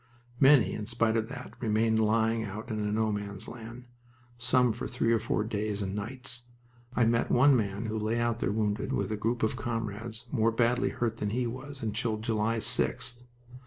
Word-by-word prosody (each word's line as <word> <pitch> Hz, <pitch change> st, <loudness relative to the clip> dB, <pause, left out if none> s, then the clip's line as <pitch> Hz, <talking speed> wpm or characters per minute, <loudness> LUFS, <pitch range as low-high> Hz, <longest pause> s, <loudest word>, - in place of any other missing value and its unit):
Many, 135 Hz, -3 st, +6 dB
in 105 Hz, -, -4 dB
spite 115 Hz, -1 st, +1 dB
of 110 Hz, 0 st, 0 dB
that, 135 Hz, -, -8 dB
remained 110 Hz, 0 st, +2 dB
lying 110 Hz, +1 st, +2 dB
out 110 Hz, +3 st, -6 dB
in 105 Hz, -1 st, -1 dB
No 110 Hz, 0 st, +1 dB
Man's 100 Hz, -1 st, -5 dB
Land, 120 Hz, +1 st, -9 dB, 0.5 s
some 125 Hz, 0 st, +3 dB
for -, -, -5 dB
three 115 Hz, -, +1 dB
or 115 Hz, -, +3 dB
four 110 Hz, -1 st, 0 dB
days 105 Hz, -1 st, -2 dB
and 95 Hz, 0 st, -3 dB
nights. 120 Hz, +3 st, -5 dB, 0.5 s
I 120 Hz, -, +4 dB
met 115 Hz, +1 st, +2 dB
one 135 Hz, +3 st, +6 dB
man 105 Hz, -1 st, -1 dB
who 110 Hz, 0 st, -2 dB
lay 110 Hz, +2 st, 0 dB
out 120 Hz, -1 st, 0 dB
there 95 Hz, -, 0 dB
wounded, 105 Hz, -1 st, -1 dB
with 100 Hz, +1 st, -1 dB
a -, -, 0 dB
group 115 Hz, +3 st, -1 dB
of 110 Hz, -, +1 dB
comrades 115 Hz, 0 st, -4 dB
more 115 Hz, -4 st, +3 dB
badly 120 Hz, +3 st, +2 dB
hurt 115 Hz, -2 st, -2 dB
than 105 Hz, -, -1 dB
he 125 Hz, +4 st, 0 dB
was, 130 Hz, +3 st, -6 dB
until 110 Hz, 0 st, -1 dB
July 110 Hz, 0 st, 0 dB
6th. 120 Hz, +2 st, -1 dB
115 Hz, 190 wpm, -29 LUFS, 110-120 Hz, 0.5 s, Many